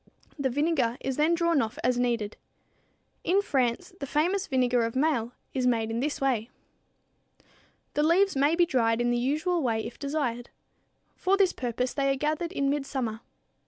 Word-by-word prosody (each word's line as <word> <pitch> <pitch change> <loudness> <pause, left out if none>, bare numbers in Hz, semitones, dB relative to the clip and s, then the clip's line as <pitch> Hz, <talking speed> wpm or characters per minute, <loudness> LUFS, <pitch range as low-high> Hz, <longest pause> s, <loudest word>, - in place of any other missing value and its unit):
The 270 -1 +1
vinegar 270 -3 +1
is 265 -1 -3
then 315 +3 +3
drawn 335 -3 +2
off 220 -1 -3
as 250 0 +2
needed. 235 -4 0 0.9
In 375 +3 +3
France, 250 - 0
the 280 - -4
famous 360 +8 +1
vinegar 250 -2 +2
of 230 +1 -3
Maille 260 -5 +1 0.2
is 255 -2 +1
made 225 -2 +1
in 230 - -1
this 290 +3 -2
way. 250 -4 0 1.4
The 295 - +1
leaves 360 +5 +3
may 285 +4 +3
be 345 0 +4
dried 230 -7 +1
in 240 0 +1
the 240 - +1
usual 310 +7 0
way 225 -4 0
if - - -8
desired. 275 -5 -2 0.7
For 385 +2 +1
this 380 -2 +3
purpose 250 0 -2
they 275 -1 +1
are - - +1
gathered 310 +4 -1
in 280 -7 0
midsummer. 270 -5 -2
270 Hz, 170 wpm, -27 LUFS, 240-310 Hz, 1.4 s, be